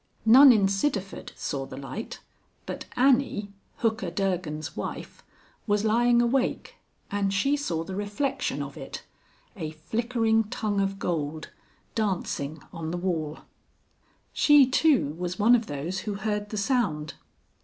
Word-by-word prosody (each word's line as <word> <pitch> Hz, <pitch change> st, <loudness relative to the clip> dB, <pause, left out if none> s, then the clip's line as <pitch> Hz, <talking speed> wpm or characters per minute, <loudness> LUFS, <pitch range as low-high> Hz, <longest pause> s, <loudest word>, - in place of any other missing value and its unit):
None 260 Hz, +5 st, +9 dB
in 205 Hz, -4 st, +4 dB
Sidderford 195 Hz, -1 st, -2 dB
saw 135 Hz, -2 st, -4 dB
the 130 Hz, -, -9 dB
light, 140 Hz, +11 st, -7 dB, 0.4 s
but -, -, -6 dB
Annie, 250 Hz, -6 st, +2 dB, 0.3 s
Hooker 220 Hz, -5 st, 0 dB
Durgan's 170 Hz, -4 st, -2 dB
wife, -, -, -6 dB, 0.5 s
was 205 Hz, 0 st, +1 dB
lying 240 Hz, +2 st, +4 dB
awake, 255 Hz, +2 st, -1 dB, 0.3 s
and 200 Hz, -1 st, 0 dB
she 240 Hz, +9 st, +2 dB
saw 170 Hz, -, -2 dB
the 185 Hz, +3 st, -6 dB
reflection 205 Hz, +8 st, -2 dB
of -, -, -9 dB
it -, -, -7 dB, 0.5 s
a 160 Hz, -6 st, -4 dB
flickering 225 Hz, +7 st, 0 dB
tongue 205 Hz, -1 st, -1 dB
of 195 Hz, 0 st, -1 dB
gold 155 Hz, -4 st, -3 dB, 0.4 s
dancing 175 Hz, -8 st, -2 dB
on 165 Hz, -2 st, -5 dB
the 175 Hz, -, -3 dB
wall. 165 Hz, -4 st, -2 dB, 0.9 s
She, 295 Hz, -2 st, +6 dB
too, 260 Hz, -, +3 dB
was 180 Hz, 0 st, -3 dB
one 220 Hz, +3 st, +5 dB
of 235 Hz, -2 st, +3 dB
those 150 Hz, +7 st, -3 dB
who 205 Hz, +1 st, -4 dB
heard 210 Hz, 0 st, -2 dB
the 215 Hz, -, -5 dB
sound. 200 Hz, -, 0 dB
200 Hz, 135 wpm, -27 LUFS, 170-235 Hz, 0.9 s, None